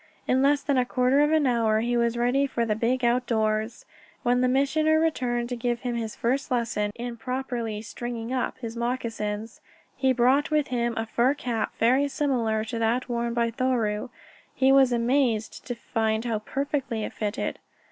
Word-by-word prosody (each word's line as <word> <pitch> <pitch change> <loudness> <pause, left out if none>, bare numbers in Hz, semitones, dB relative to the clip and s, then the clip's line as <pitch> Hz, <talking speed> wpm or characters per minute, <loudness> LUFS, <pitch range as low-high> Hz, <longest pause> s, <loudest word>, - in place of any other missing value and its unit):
In 260 +1 +3
less 285 +1 +3
than 280 -3 +2
a - - +3
quarter 255 +2 +2
of 295 +1 +3
an 315 -2 +3
hour 225 -3 +2
he 240 +1 0
was 235 0 +1
ready 250 +4 +2
for 235 -3 -1
the 215 - +1
big 240 +3 0
outdoors. 225 -2 0 0.4
When 245 0 +2
the 255 - +3
Missioner 310 +4 +2
returned 250 -7 0
to 250 - -2
give 240 0 -2
him 245 -2 -2
a 230 -2 -2
first 260 +6 -1
lesson 230 -4 0
in 240 0 -5
properly 240 -3 -3
"stringing 240 +1 -5
up" 255 - -1
his 230 -2 -6
moccasins, 225 -3 -3 0.3
he 265 -1 +2
brought 260 +3 +3
with 300 -2 +1
him 235 -2 -1
a 225 - -1
fur 240 +5 +2
cap 235 -6 -2
very 260 +5 +3
similar 240 -7 0
to 230 +1 -4
that 235 +3 0
worn 235 0 -1
by 235 -1 +1
Thoreau. 230 -4 -1 0.5
He 265 0 +4
was 270 -2 +5
amazed 240 -2 0
to 245 - -3
find 220 -1 -1
how 225 -3 -1
perfectly 270 -1 -2
it - - -5
fitted. 210 +2 -3
240 Hz, 180 wpm, -26 LUFS, 230-260 Hz, 0.5 s, was